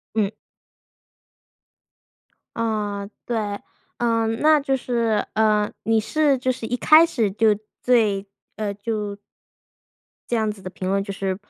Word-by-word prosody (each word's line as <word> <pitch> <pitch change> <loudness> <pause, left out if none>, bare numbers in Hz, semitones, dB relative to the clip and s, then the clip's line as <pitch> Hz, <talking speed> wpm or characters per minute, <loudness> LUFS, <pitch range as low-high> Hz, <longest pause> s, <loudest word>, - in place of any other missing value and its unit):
嗯。 210 -3 +2 2.3
嗯， 210 -3 -2 0.2
对。 235 -2 -1 0.6
嗯， 230 -1 0
那 310 0 +5
就 275 -1 0
是， 235 -4 0
呃， 215 -1 +2
你 225 0 +2
是 290 +3 +2
就 255 +1 0
是 245 -3 -3
一 245 - -1
开 310 +5 +7
始 235 -11 0
就 215 +2 +3 0.3
对， 215 -5 +2 0.3
呃 210 -2 -2
就 210 -1 -3 1.2
这 240 - +2
样 220 -1 +1
子 205 -2 -6
的 185 - -6
评 185 0 -5
论 195 +1 +1
就 200 0 -5
是 190 -1 -2
220 Hz, 140 characters per minute, -23 LUFS, 205-240 Hz, 2.3 s, 开